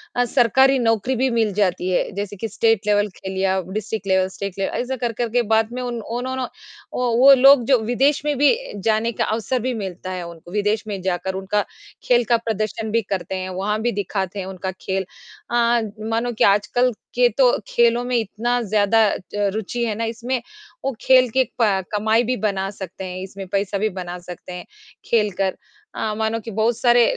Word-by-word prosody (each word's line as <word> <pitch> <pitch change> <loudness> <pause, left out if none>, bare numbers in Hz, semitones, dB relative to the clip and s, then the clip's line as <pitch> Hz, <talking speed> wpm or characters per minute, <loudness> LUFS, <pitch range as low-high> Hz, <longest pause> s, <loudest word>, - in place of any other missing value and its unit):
अ, 245 0 +2
सरकारी 265 +2 +4
नौकरी 225 +2 +1
भी 260 +2 +1
मिल 225 -4 +1
जाती 185 -2 0
है, 180 - +1
जैसे 205 0 -4
कि 225 +4 -4
स्टेट 225 0 +1
लेवल 205 0 +3
खेल 190 0 -6
या 190 0 +2
डिस्ट्रिक्ट 215 0 -4
लेवल, 190 0 +3
स्टेट 195 0 -6
लेवल 195 - -1
ऐसा 260 +1 -3
कर 235 - 0
कर 235 +1 -2
के 245 +2 +2
बाद 220 +1 +2
में 250 - -4
ओनोनो 245 +2 -3 0.5
ओ 250 - -1
वो 275 +2 +8
लोग 270 -1 +7
जो 260 -3 +4
विदेश 270 +5 +2
में 295 -1 +1
भी 290 - +5 0.3
जाने 220 +2 +1
का - - -1
अवसर 230 +3 -1
भी 255 +2 -2
मिलता 185 -3 -5
है 180 -1 -4
उनको, 170 +1 -12
विदेश 215 +1 +1
में 200 -3 -4
जाकर 185 0 -2
उनका 195 +2 0 0.4
खेल 245 -1 +3
का 235 - +5
प्रदर्शन 220 0 -3
भी 230 0 +2
करते 190 -1 -4
हैं, 185 0 -4
वहाँ 200 +4 -2
भी 240 +1 +1
दिखाते 195 -1 -3
हैं 185 - -4
उनका 190 0 -5
खेल। 190 0 -1 0.5
अ, - - 0 0.5
मानो 230 +2 0
कि - - +1
आजकल 210 +5 +3 0.2
के 245 0 +5
तो 255 -3 +6 0.2
खेलों 235 0 +3
में 250 0 -2
इतनी 235 +3 -1
ज़्यादा 215 +2 +3
अ, - - 0 0.2
रुचि 205 +3 -1
है 215 -2 -2
ना 230 - -3
इसमें, 240 +2 -2 0.4
वो 270 - +1
खेल 255 -2 +5
की 260 +3 +2
अ, 210 -6 0
कमाई 220 +3 +2
भी 250 +1 -1
बना 195 -1 -2
सकते 190 -1 -8
हैं, 180 0 -6
इसमें 195 0 -8
पैसा 200 +1 -1
भी 215 +2 0
बना 180 -2 -6
सकते 180 0 -9
हैं 180 - -7 0.4
खेल 210 -3 +2
कर। 190 -1 +1 0.4
अ, 215 -1 -2
मानो 220 +1 0
कि 225 - -5
बहुत 220 +3 +1
सारे 240 -1 +5
220 Hz, 200 wpm, -21 LUFS, 195-240 Hz, 0.5 s, वो